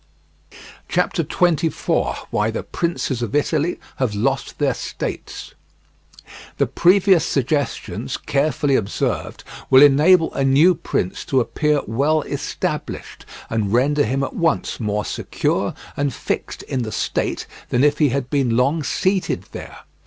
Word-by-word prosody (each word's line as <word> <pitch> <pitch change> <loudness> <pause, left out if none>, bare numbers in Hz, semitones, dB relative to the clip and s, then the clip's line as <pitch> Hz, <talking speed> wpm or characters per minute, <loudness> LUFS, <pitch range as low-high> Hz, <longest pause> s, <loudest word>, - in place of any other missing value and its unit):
CHAPTER - - +1
XXIV. 170 -3 0 0.2
WHY 105 +1 +1
THE 110 - -3
PRINCES 165 -7 -2
OF 120 +3 -3
ITALY 155 +3 0 0.2
HAVE 125 -6 -1
LOST 135 +6 -1
THEIR 140 -3 +1
STATES - - -6 1.0
The - - +3
previous 185 0 +4
suggestions, 140 +2 -2
carefully 140 -1 0
observed, 100 -5 -2 0.3
will 130 +1 +8
enable 160 +5 +5
a 135 - -1
new 140 +7 +5
prince 95 - -3
to 135 - +2
appear 150 +4 +1
well 145 +7 +1
established, - - -4 0.2
and 110 -3 -1
render 145 +4 +3
him 135 +5 0
at 135 - -3
once 165 -2 0
more 105 -2 -1
secure - - -1 0.2
and 145 -1 0
fixed - - -4
in 130 - -3
the 110 -2 -4
state - - -2 0.2
than 125 - +2
if 150 0 +3
he 150 -3 +4
had 130 0 -2
been 130 -5 +1
long 140 +6 +2
seated 185 +7 0
there. - - -9
140 Hz, 135 wpm, -21 LUFS, 125-155 Hz, 1.0 s, will